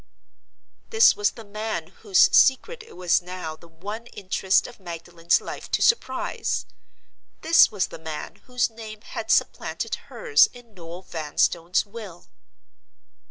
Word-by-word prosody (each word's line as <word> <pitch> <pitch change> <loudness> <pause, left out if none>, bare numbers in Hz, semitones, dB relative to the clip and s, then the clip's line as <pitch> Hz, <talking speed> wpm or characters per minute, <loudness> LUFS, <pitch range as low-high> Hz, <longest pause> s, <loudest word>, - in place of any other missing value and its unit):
This 450 0 +6
was 205 0 +2
the 230 - -12
man 210 -5 -4
whose 200 -4 +4
secret 445 - +4
it - - -15
was 180 -1 +2
now 180 -3 -6
the 170 - -17
one 205 +8 -8
interest 190 -2 0
of 240 - -11
Magdalen's 170 -1 -1
life - - -8
to - - 0
surprise! 465 0 0 0.8
This 330 +1 +6
was 200 -4 0
the - - -10
man 160 -1 -7
whose 250 -1 +1
name 220 -1 -10
had - - -7
supplanted - - 0 0.2
hers 465 -3 +4
in 245 -3 -16
Noel 175 0 -10
Vanstone's 170 +2 0
will! 200 -5 -10
195 Hz, 135 wpm, -24 LUFS, 170-230 Hz, 0.8 s, This